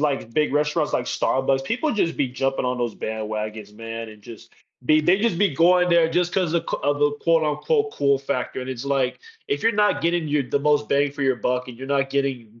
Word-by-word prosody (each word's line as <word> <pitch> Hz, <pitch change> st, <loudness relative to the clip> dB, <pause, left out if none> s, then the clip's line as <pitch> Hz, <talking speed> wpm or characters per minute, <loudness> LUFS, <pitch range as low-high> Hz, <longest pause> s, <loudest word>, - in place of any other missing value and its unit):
like, 140 Hz, -6 st, -1 dB
big 150 Hz, 0 st, +1 dB
restaurants, 150 Hz, +1 st, 0 dB
like 125 Hz, -, 0 dB
Starbucks, 135 Hz, +1 st, 0 dB
people 250 Hz, +6 st, -1 dB
just 170 Hz, -6 st, 0 dB
be 140 Hz, -, +1 dB
jumping 135 Hz, +1 st, -1 dB
on 125 Hz, 0 st, -1 dB
those 120 Hz, -2 st, -2 dB
bandwagons, 110 Hz, -1 st, -5 dB
man, 115 Hz, 0 st, -6 dB
and 110 Hz, -1 st, -13 dB
just 115 Hz, +2 st, -13 dB, 0.3 s
be 155 Hz, +3 st, +4 dB
they 175 Hz, +5 st, +3 dB
just 215 Hz, -7 st, +1 dB
be 200 Hz, -8 st, +2 dB
going 180 Hz, +3 st, +4 dB
there 170 Hz, -1 st, +4 dB
just 175 Hz, +1 st, 0 dB
'cause 180 Hz, -4 st, 0 dB
a 170 Hz, -, +3 dB
q -, -, -3 dB
of 145 Hz, 0 st, 0 dB
a 145 Hz, 0 st, +3 dB
quote, 165 Hz, +2 st, +2 dB
unquote 430 Hz, -, 0 dB
"cool 140 Hz, -1 st, +2 dB
factor," 130 Hz, -1 st, -3 dB
and 130 Hz, -, -6 dB
it's 125 Hz, +1 st, -6 dB
like, 135 Hz, -2 st, 0 dB, 0.3 s
if 420 Hz, -, -2 dB
you're 225 Hz, -, +4 dB
not 210 Hz, -1 st, +2 dB
getting 170 Hz, -1 st, +1 dB
your 145 Hz, -1 st, +1 dB
the 130 Hz, +3 st, -1 dB
most 145 Hz, 0 st, +1 dB
bang 140 Hz, 0 st, +2 dB
for 145 Hz, -, -5 dB
your 135 Hz, -2 st, +2 dB
buck 125 Hz, +2 st, -1 dB
and 120 Hz, -1 st, -10 dB
you're 135 Hz, -, -7 dB
not 135 Hz, -1 st, 0 dB
getting 125 Hz, -5 st, -3 dB
140 Hz, 235 wpm, -23 LUFS, 125-165 Hz, 0.3 s, be